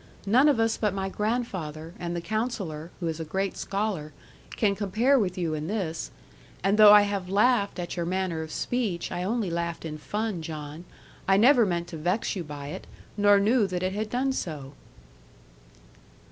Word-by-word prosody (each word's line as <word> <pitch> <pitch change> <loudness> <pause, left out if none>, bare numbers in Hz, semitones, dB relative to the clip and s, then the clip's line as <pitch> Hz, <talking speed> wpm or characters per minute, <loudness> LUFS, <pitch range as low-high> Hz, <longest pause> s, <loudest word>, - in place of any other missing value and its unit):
None 250 +9 +5
of 275 -6 +2
us 225 0 +2
but 210 -3 0
my 195 0 -2
grandfather, 185 -8 -3
and 175 -1 -3
the 170 - -2
Counsellor 190 -6 -3
(who 170 - -2
is 160 0 -3
a - - -2
great 190 +5 -2
scholar), 195 -7 -3 0.4
can 205 -3 +3
compare 220 +7 +2
with 185 -5 -1
you 170 -3 -1
in 155 0 -3
this. 185 -6 -3 0.5
And 200 +3 +2
though 210 -1 +10
I 210 0 +9
have 200 -3 -3
laughed 205 0 +2
at 175 -1 -4
your 170 -1 -2
manner 185 -3 -1
of 160 0 -7
speech, 215 -9 -2
I 175 - -3
only 205 0 -1
laughed 170 0 -3
in 155 -1 -5
fun, 210 +2 -3
John; 155 +1 -7 0.4
I 195 - +5
never 240 0 +6
meant 170 -1 -1
to 165 - -6
vex 180 +10 -1
you 180 - -3
by 145 -2 -7
it, - - -7 0.3
nor 205 -1 +5
knew 215 +1 +3
that 180 -1 -3
it 185 +1 -1
had 215 +1 -3
done 265 +3 0
so.' 150 - -5
190 Hz, 190 wpm, -27 LUFS, 165-215 Hz, 0.5 s, though